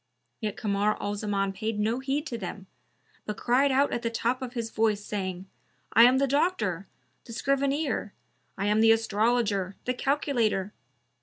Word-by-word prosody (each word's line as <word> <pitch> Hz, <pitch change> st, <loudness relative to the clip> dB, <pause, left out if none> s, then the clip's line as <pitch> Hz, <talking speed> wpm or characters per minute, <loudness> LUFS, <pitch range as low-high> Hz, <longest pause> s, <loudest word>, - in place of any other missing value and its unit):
Yet 215 Hz, -3 st, -3 dB
Kamar 205 Hz, 0 st, 0 dB
al 205 Hz, -, -2 dB
Zaman 200 Hz, -2 st, -1 dB
paid 215 Hz, +2 st, -3 dB
no 220 Hz, +4 st, 0 dB
heed 275 Hz, +3 st, -2 dB
to 250 Hz, -, -4 dB
them, 190 Hz, 0 st, -6 dB, 0.6 s
but 210 Hz, -, -3 dB
cried 265 Hz, +3 st, +3 dB
out 275 Hz, +2 st, +2 dB
at 240 Hz, -, -1 dB
the 230 Hz, -, -1 dB
top 235 Hz, +3 st, -1 dB
of 250 Hz, -2 st, -5 dB
his 230 Hz, -3 st, -4 dB
voice, 215 Hz, -2 st, +1 dB
saying, 190 Hz, -3 st, -4 dB, 0.5 s
"I 230 Hz, -, +8 dB
am 255 Hz, +2 st, +5 dB
the 275 Hz, -, +3 dB
Doctor, 235 Hz, -, 0 dB, 0.4 s
the 230 Hz, -, -10 dB
Scrivener! 275 Hz, -2 st, 0 dB, 0.5 s
I 195 Hz, -, -2 dB
am 210 Hz, +1 st, +3 dB
the 225 Hz, 0 st, +6 dB
Astrologer, 215 Hz, -3 st, +1 dB
the 250 Hz, -, 0 dB
Calculator!" 245 Hz, -7 st, 0 dB
225 Hz, 165 wpm, -27 LUFS, 205-255 Hz, 0.6 s, I